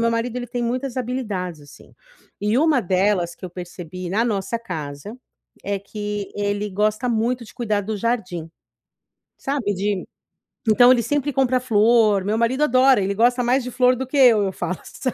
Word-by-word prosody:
meu 230 Hz, 0 st, +2 dB
marido, 230 Hz, +1 st, -2 dB
ele 245 Hz, -1 st, -4 dB
tem 240 Hz, +1 st, -4 dB
muitas 255 Hz, +2 st, -2 dB
habilidades, 210 Hz, -, -3 dB
assim. 145 Hz, -, -16 dB, 0.5 s
E 210 Hz, +3 st, +1 dB
uma 300 Hz, -2 st, +3 dB
delas 185 Hz, -3 st, +1 dB
que -, -, -12 dB
eu 180 Hz, -, -6 dB
percebi 180 Hz, 0 st, -8 dB
na 210 Hz, +6 st, +1 dB
nossa 220 Hz, 0 st, -1 dB
casa 160 Hz, -2 st, -7 dB, 0.5 s
é 200 Hz, 0 st, -2 dB
que 205 Hz, 0 st, -5 dB
ele 205 Hz, 0 st, -2 dB
gosta 215 Hz, +5 st, 0 dB
muito 235 Hz, +1 st, 0 dB
de -, -, -14 dB
cuidar 215 Hz, -4 st, -1 dB
do 215 Hz, +1 st, -3 dB
jardim. 185 Hz, -8 st, -2 dB, 0.9 s
Sabe, 265 Hz, -7 st, -2 dB
de 195 Hz, 0 st, -2 dB, 0.6 s
então 245 Hz, +3 st, +6 dB
ele 240 Hz, -2 st, +3 dB
sempre 290 Hz, +2 st, -1 dB
compra 255 Hz, -1 st, +2 dB
flor; 220 Hz, -4 st, +3 dB
meu 210 Hz, +3 st, 0 dB
marido 250 Hz, +5 st, +1 dB
adora. 260 Hz, -2 st, +5 dB
Ele 195 Hz, +1 st, 0 dB
gosta 245 Hz, +3 st, +3 dB
mais 255 Hz, +2 st, +2 dB
de 250 Hz, -, -5 dB
flor 250 Hz, +1 st, +3 dB
do 260 Hz, +1 st, -4 dB
que 285 Hz, -, -3 dB
eu, 240 Hz, -5 st, +6 dB
eu 190 Hz, -, -1 dB
falo, 185 Hz, -1 st, -4 dB
sabe. 255 Hz, -, -4 dB
220 Hz, 180 wpm, -22 LUFS, 195-250 Hz, 0.9 s, então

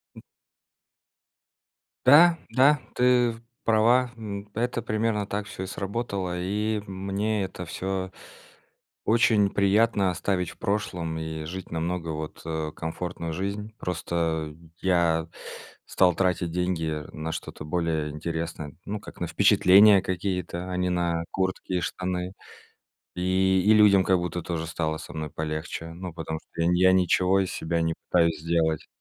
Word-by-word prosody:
М. -, -, -11 dB, 1.8 s
Да, 165 Hz, +5 st, +8 dB
да, 140 Hz, +2 st, +4 dB, 0.2 s
ты 125 Hz, -2 st, +3 dB, 0.3 s
права. 120 Hz, +3 st, +4 dB
М, 105 Hz, -2 st, -7 dB
это 120 Hz, +1 st, -1 dB
примерно 110 Hz, -1 st, -1 dB
так 105 Hz, 0 st, -3 dB
всё 95 Hz, -, -7 dB
и -, -, -3 dB
сработало. 100 Hz, -3 st, -3 dB
И 105 Hz, +3 st, -1 dB
мне 100 Hz, +2 st, -2 dB
это 90 Hz, -1 st, -6 dB
всё 95 Hz, +2 st, -3 dB, 0.9 s
очень 110 Hz, -3 st, +4 dB
приятно 100 Hz, 0 st, +3 dB
оставить 90 Hz, 0 st, -1 dB
в -, -, -17 dB
прошлом 90 Hz, -5 st, -2 dB
и 80 Hz, -1 st, -5 dB
жить 95 Hz, +2 st, -7 dB
намного 85 Hz, +1 st, -2 dB
вот, 75 Hz, 0 st, -6 dB
э, 80 Hz, -1 st, -3 dB
комфортную 85 Hz, 0 st, -4 dB
жизнь. 100 Hz, +4 st, -4 dB
Просто 80 Hz, -3 st, -2 dB, 0.3 s
я 85 Hz, -3 st, +2 dB, 0.6 s
стал 90 Hz, -2 st, +3 dB
тратить 90 Hz, -3 st, 0 dB
деньги 80 Hz, -4 st, -1 dB
на 80 Hz, +1 st, -4 dB
что-то -, -, -7 dB
более 80 Hz, -2 st, -1 dB
интересное. 80 Hz, -1 st, -5 dB
Ну, 105 Hz, +1 st, -4 dB
как, -, -, -12 dB
на 85 Hz, -, -1 dB
впечатления 100 Hz, +2 st, +6 dB
какие-то, 90 Hz, -1 st, -3 dB
а -, -, -2 dB
не 90 Hz, 0 st, 0 dB
на 85 Hz, -2 st, 0 dB
куртки 95 Hz, 0 st, -2 dB
и 90 Hz, -, +1 dB
штаны. 90 Hz, +1 st, -3 dB, 0.8 s
И 95 Hz, +1 st, +2 dB
и 110 Hz, -, +6 dB
людям 105 Hz, -3 st, +6 dB
как 95 Hz, 0 st, +4 dB
будто 90 Hz, 0 st, -3 dB
тоже 80 Hz, -2 st, -3 dB
стало 80 Hz, -1 st, -2 dB
со -, -, -10 dB
мной 80 Hz, -1 st, -4 dB
полегче. 80 Hz, +1 st, -4 dB
Ну, 90 Hz, 0 st, -7 dB
потому 80 Hz, -1 st, -5 dB
что 85 Hz, -, -7 dB
я 85 Hz, -, +3 dB, 0.2 s
я -, -, +5 dB
ничего 95 Hz, +1 st, +3 dB
из 95 Hz, -, -2 dB
себя 85 Hz, +1 st, -1 dB
не 80 Hz, 0 st, 0 dB, 0.2 s
пытаюсь 85 Hz, -3 st, +3 dB
сделать. 80 Hz, -1 st, 0 dB
90 Hz, 145 wpm, -26 LUFS, 85-100 Hz, 1.8 s, Да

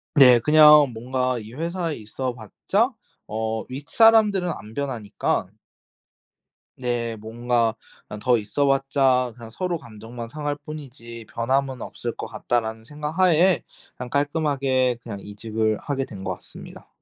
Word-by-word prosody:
네. 125 Hz, -4 st, +8 dB
그냥 150 Hz, 0 st, +7 dB
뭔가 125 Hz, +2 st, -1 dB
이 110 Hz, +2 st, -10 dB
회사에 170 Hz, +1 st, -3 dB
있어 120 Hz, +4 st, -4 dB
봤자 195 Hz, -, 0 dB, 0.4 s
어 110 Hz, 0 st, -2 dB
윗사람들은 195 Hz, -, +4 dB
안 105 Hz, +3 st, -12 dB
변하니까 125 Hz, -7 st, -2 dB, 1.3 s
네. 120 Hz, -2 st, -2 dB
뭔가 115 Hz, +1 st, 0 dB, 0.3 s
그냥 105 Hz, -, -7 dB
'더 125 Hz, +1 st, +3 dB
있어 140 Hz, +7 st, 0 dB
봤자 135 Hz, -2 st, +2 dB
그냥 115 Hz, -2 st, -11 dB
서로 175 Hz, +8 st, -2 dB
감정만 115 Hz, +1 st, -9 dB
상할 145 Hz, +2 st, -3 dB
뿐이지 120 Hz, -7 st, -9 dB
변함은 130 Hz, +2 st, 0 dB
없을 -, -, -5 dB
것 -, -, -5 dB
같다.'라는 110 Hz, -2 st, -2 dB
생각 150 Hz, +5 st, -6 dB
하에 180 Hz, 0 st, +4 dB, 0.3 s
그냥 125 Hz, -1 st, -6 dB
깔끔하게 140 Hz, -4 st, +1 dB
그냥 100 Hz, -4 st, -6 dB
이직을 110 Hz, +1 st, -2 dB
하게 140 Hz, -2 st, -2 dB
된 105 Hz, -, -10 dB
것 -, -, -2 dB
같습니다. -, -, -11 dB
125 Hz, 280 characters per minute, -24 LUFS, 115-150 Hz, 1.3 s, 네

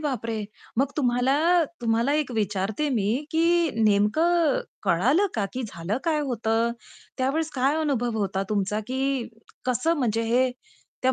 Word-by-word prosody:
बापरे! 230 Hz, -7 st, -2 dB, 0.4 s
मग 275 Hz, +1 st, +1 dB
तुम्हाला 250 Hz, -2 st, +2 dB, 0.5 s
तुम्हाला 230 Hz, +3 st, +1 dB
एक 290 Hz, -, -4 dB
विचारते 205 Hz, +6 st, -1 dB
मी, 215 Hz, -6 st, 0 dB, 0.2 s
की 335 Hz, 0 st, +3 dB
नेमकं 315 Hz, -, +3 dB, 0.2 s
कळालं 260 Hz, -, +3 dB
का, 215 Hz, -, 0 dB
की 255 Hz, -, -3 dB
झालं 205 Hz, +1 st, -3 dB
काय 315 Hz, -3 st, +1 dB
होतं? 230 Hz, -1 st, +1 dB, 0.5 s
त्यावेळेस 295 Hz, +5 st, 0 dB
काय 270 Hz, +2 st, +2 dB
अनुभव 245 Hz, -7 st, 0 dB
होता 195 Hz, -1 st, -1 dB
तुमचा, 210 Hz, 0 st, 0 dB
की 265 Hz, 0 st, -1 dB, 0.4 s
कसं 255 Hz, +6 st, +1 dB
म्हणजे 230 Hz, -3 st, 0 dB
हे 245 Hz, +3 st, +2 dB, 0.5 s
त्या 260 Hz, 0 st, +3 dB
250 Hz, 135 wpm, -25 LUFS, 220-285 Hz, 0.5 s, की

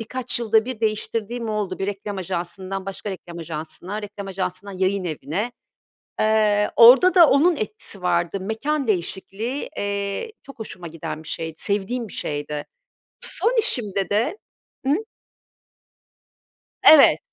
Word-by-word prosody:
birkaç 245 Hz, +2 st, -2 dB
yılda 220 Hz, -1 st, +3 dB
bir 250 Hz, -3 st, -6 dB
değiştirdiğim 225 Hz, +1 st, -2 dB
oldu. 210 Hz, -3 st, -2 dB
Bir 195 Hz, -, -2 dB
reklam 205 Hz, 0 st, -5 dB
ajansından 185 Hz, +2 st, -4 dB
başka 195 Hz, +1 st, -5 dB
reklam 175 Hz, -2 st, -8 dB
ajansına, 170 Hz, +5 st, -5 dB
reklam 205 Hz, -1 st, -7 dB
ajansından 185 Hz, 0 st, -3 dB
yayınevine 185 Hz, -, -2 dB, 0.7 s
Eee, 215 Hz, -1 st, +3 dB
orada 260 Hz, +11 st, +8 dB
da 345 Hz, -4 st, +8 dB
onun 320 Hz, +5 st, +4 dB
etkisi 210 Hz, -4 st, -3 dB
vardı, 175 Hz, +1 st, 0 dB
mekân 265 Hz, +8 st, -2 dB
değişikliği, 205 Hz, +6 st, -2 dB
eee, 200 Hz, -, -3 dB
çok 275 Hz, -, -13 dB
hoşuma 185 Hz, -5 st, -7 dB
giden 160 Hz, -1 st, -6 dB
bir 160 Hz, -, -10 dB
şeydi. 160 Hz, 0 st, -4 dB
Sevdiğim 210 Hz, +4 st, -1 dB
bir -, -, -12 dB
şeydi. 145 Hz, 0 st, -4 dB, 0.6 s
Son 475 Hz, +2 st, +3 dB
işimde 205 Hz, -, 0 dB
de 225 Hz, -, 0 dB, 0.5 s
Hı? 275 Hz, -, +3 dB, 1.9 s
Evet. 310 Hz, -3 st, +8 dB
205 Hz, 125 wpm, -22 LUFS, 185-230 Hz, 1.9 s, orada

